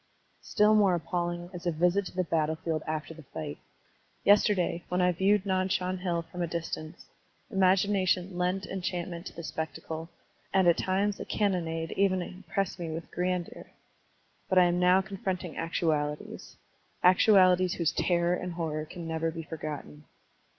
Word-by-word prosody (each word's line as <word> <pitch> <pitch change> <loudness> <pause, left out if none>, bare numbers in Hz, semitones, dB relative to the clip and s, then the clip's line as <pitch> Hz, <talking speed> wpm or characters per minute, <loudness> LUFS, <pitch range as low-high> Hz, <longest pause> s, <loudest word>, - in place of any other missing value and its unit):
Still 210 0 +3
more 200 -4 +5
appalling 175 0 -3
is 180 0 -6
a - - +3
visit 180 +4 +1
to - - -11
the 185 - +1
battle 160 -1 0
field 160 -1 -2
after 155 0 -3
the 160 - -12
fight. 150 +1 -7 0.6
Yesterday, 200 -4 +3
when 180 - 0
I 180 0 +4
viewed 195 +3 +2
Nan 185 -1 +1
Shan 185 0 -1
Hill 175 -2 -1
from 180 +2 -7
a 170 - 0
distance, 165 -1 -5 0.5
imagination 190 -1 +2
lent 180 +2 0
enchantment 175 -1 -4
to - - -10
the 170 - -7
spectacle, 160 +1 -5 0.4
and 190 -2 +3
at 170 - +4
times 195 +2 0
the - - -6
cannonade 165 -5 -1
even 185 -2 +2
impressed 190 +1 -4
me 170 -2 -4
with 160 +1 -6
grandeur. 180 -1 -3 0.8
But 185 - +2
1 180 -1 +7
am 175 +1 0
now 180 +1 +5
confronting 190 -3 -4
actualities, 155 -3 -2 0.2
— - - -36
actualities 185 -1 +5
whose 170 -3 +1
terror 175 -1 +1
and 180 0 -3
horror 155 -2 -3
can 170 +1 -8
never 160 0 -1
be 165 0 -6
forgotten. 150 -1 -7
175 Hz, 160 wpm, -29 LUFS, 165-185 Hz, 0.8 s, 1